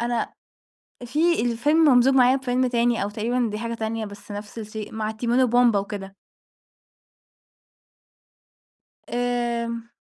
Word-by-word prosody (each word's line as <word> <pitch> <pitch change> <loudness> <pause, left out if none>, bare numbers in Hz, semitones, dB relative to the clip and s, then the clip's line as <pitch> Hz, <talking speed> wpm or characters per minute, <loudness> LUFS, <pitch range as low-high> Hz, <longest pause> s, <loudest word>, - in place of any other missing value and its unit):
أنا 235 0 -1 0.7
فيه 320 +4 +1
الفيلم 290 +7 +1
ممزوج 260 -1 +5
معايا 255 0 +5
بفيلم 255 -1 0
تاني 240 -2 +1
أو 200 - -2
تقريبًا 235 +3 -1
دي 210 - -4
حاجة 230 +1 -4
تانية 225 0 -3
بس 205 0 -11
نفس 205 +2 -7
الشيء، 215 -1 -7
مع 220 0 -2
تيمون 235 +3 0
وبومبا 240 -3 +4
وكده. 195 -1 -6 3.0
آمم، 235 -1 -2
235 Hz, 120 wpm, -24 LUFS, 220-245 Hz, 3.0 s, ممزوج